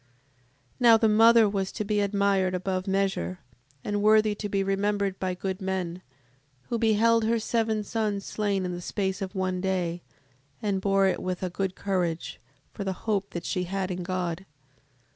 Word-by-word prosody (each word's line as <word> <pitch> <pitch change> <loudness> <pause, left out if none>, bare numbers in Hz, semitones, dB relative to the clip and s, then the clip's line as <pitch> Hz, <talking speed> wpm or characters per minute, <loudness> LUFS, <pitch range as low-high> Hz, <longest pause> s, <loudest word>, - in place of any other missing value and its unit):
7:20. 125 - -36 0.7
Now 235 -2 +7
the 225 0 +3
mother 225 +1 +6
was 195 -2 -2
to 215 - -3
be 210 0 0
admired 200 -2 +1
above 185 +1 -2
measure, 190 - 0 0.5
and 205 0 -1
worthy 215 0 +4
to 205 0 -5
be 195 -1 0
remembered 195 0 0
by 185 -1 -2
good 190 +2 -4
men, 185 -2 -3 0.7
who 235 - -1
beheld 225 +1 +3
her 230 +1 +2
seven 220 -1 0
sons 210 -2 -2
slain 200 -3 -1
in 180 - -2
the 175 0 -5
space 190 +2 -2
of 195 +1 -5
one 185 -1 -1
day, 180 -2 -1 0.6
and 200 -3 -1
bore 195 0 +3
it 190 - +1
with 185 0 -3
a 180 - -2
good 190 0 -2
courage, 180 -4 -2 0.3
for 205 - -5
the 190 -1 -2
hope 205 -3 0
that 170 -1 -6
she 180 0 -1
had 190 +1 -2
in 180 0 -3
God: 180 -2 -2
7:21. 190 - -19
195 Hz, 180 wpm, -27 LUFS, 185-210 Hz, 0.7 s, Now